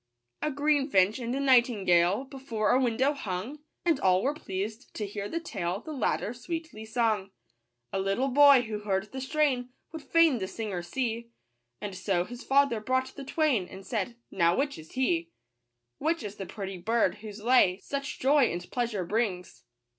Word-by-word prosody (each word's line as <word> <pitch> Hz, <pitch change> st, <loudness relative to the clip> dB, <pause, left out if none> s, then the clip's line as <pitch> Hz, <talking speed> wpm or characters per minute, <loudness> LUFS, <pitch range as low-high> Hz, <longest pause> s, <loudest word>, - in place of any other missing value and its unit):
A 305 Hz, -, 0 dB
greenfinch 275 Hz, -8 st, +2 dB
and 240 Hz, +1 st, -3 dB
a -, -, -1 dB
nightingale 215 Hz, -7 st, +4 dB
Before 260 Hz, -6 st, -2 dB
a 255 Hz, -, +4 dB
window 255 Hz, +3 st, +2 dB
hung, 215 Hz, +1 st, -4 dB
S -, -, -33 dB, 0.3 s
And 330 Hz, -5 st, +3 dB
all 185 Hz, 0 st, +3 dB
were 280 Hz, -, +1 dB
pleased 215 Hz, -2 st, -5 dB
to 210 Hz, -, -3 dB
hear 205 Hz, 0 st, -5 dB
the 335 Hz, -, -2 dB
tale 190 Hz, -, -3 dB
The 310 Hz, +6 st, -8 dB
latter 235 Hz, -3 st, -1 dB
sweetly 315 Hz, -2 st, -6 dB
sung. 220 Hz, -3 st, +1 dB
^ -, -, -30 dB, 0.6 s
A 195 Hz, -, 0 dB
little 195 Hz, +8 st, 0 dB
boy 280 Hz, -1 st, +7 dB
who 215 Hz, -2 st, -4 dB
heard 200 Hz, 0 st, -2 dB
the 265 Hz, -, -5 dB
strain 265 Hz, -3 st, +1 dB, 0.2 s
Would 320 Hz, -1 st, -7 dB
fain 325 Hz, -4 st, +4 dB
the 190 Hz, -, -3 dB
singer 205 Hz, -4 st, -4 dB
see; 235 Hz, +5 st, -3 dB, 0.5 s
And 205 Hz, -2 st, -5 dB
so 185 Hz, -1 st, 0 dB
his 245 Hz, +4 st, -9 dB
father 275 Hz, -4 st, +3 dB
brought 260 Hz, +3 st, -1 dB
the 280 Hz, -, -7 dB
twain, 270 Hz, -, +1 dB
And 190 Hz, 0 st, -10 dB
said, 230 Hz, 0 st, -2 dB
" -, -, -50 dB
Now, 170 Hz, -1 st, +3 dB
which 285 Hz, -, -1 dB
is 160 Hz, -, -13 dB
he, 265 Hz, +7 st, +2 dB
— -, -, -9 dB
£2 -, -, -18 dB
5 335 Hz, -, -33 dB, 0.7 s
Which 325 Hz, -2 st, 0 dB
is 205 Hz, -1 st, -7 dB
the 195 Hz, -, -6 dB
pretty 195 Hz, -3 st, -6 dB
bird 215 Hz, -1 st, +1 dB
whose 215 Hz, -1 st, -9 dB
lay 215 Hz, -5 st, +4 dB
Such 275 Hz, +8 st, -5 dB
joy 275 Hz, +1 st, +4 dB
and 175 Hz, +1 st, -6 dB
pleasure 230 Hz, -7 st, -1 dB
brings 180 Hz, -, -2 dB
235 Hz, 190 wpm, -28 LUFS, 195-275 Hz, 0.7 s, boy